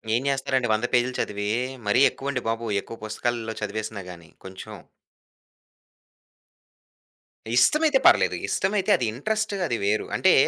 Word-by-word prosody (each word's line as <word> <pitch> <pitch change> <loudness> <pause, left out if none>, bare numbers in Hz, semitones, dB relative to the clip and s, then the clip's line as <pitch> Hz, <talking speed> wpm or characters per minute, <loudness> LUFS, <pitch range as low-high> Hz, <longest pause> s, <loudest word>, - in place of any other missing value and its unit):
ఏం 120 - +1
జేస్తారండి 130 -2 0
100 110 +3 0
పేజులు 125 +1 +2
చదివి? 105 0 -2 0.4
మరీ 105 +5 +3
ఎక్కువండి 135 -2 -4
బాబు. 115 +1 -2
ఎక్కువ 115 - -10
పుస్తకాల్లో 115 +1 -3
చదివేసినా 110 -1 -4
గాని. 85 -2 -13 0.2
కొంచెం 95 +3 -9 2.8
ఇష్టమైతే 305 - +4
పర్లేదు. - - +4
ఇష్టమైతే 195 +1 0
అది 125 - -1
ఇంట్రెస్ట్ 215 - -2
అది 120 - -1
వేరు. 105 +2 +1
అంటే - - +4
120 Hz, 120 wpm, -24 LUFS, 110-135 Hz, 2.8 s, ఇష్టమైతే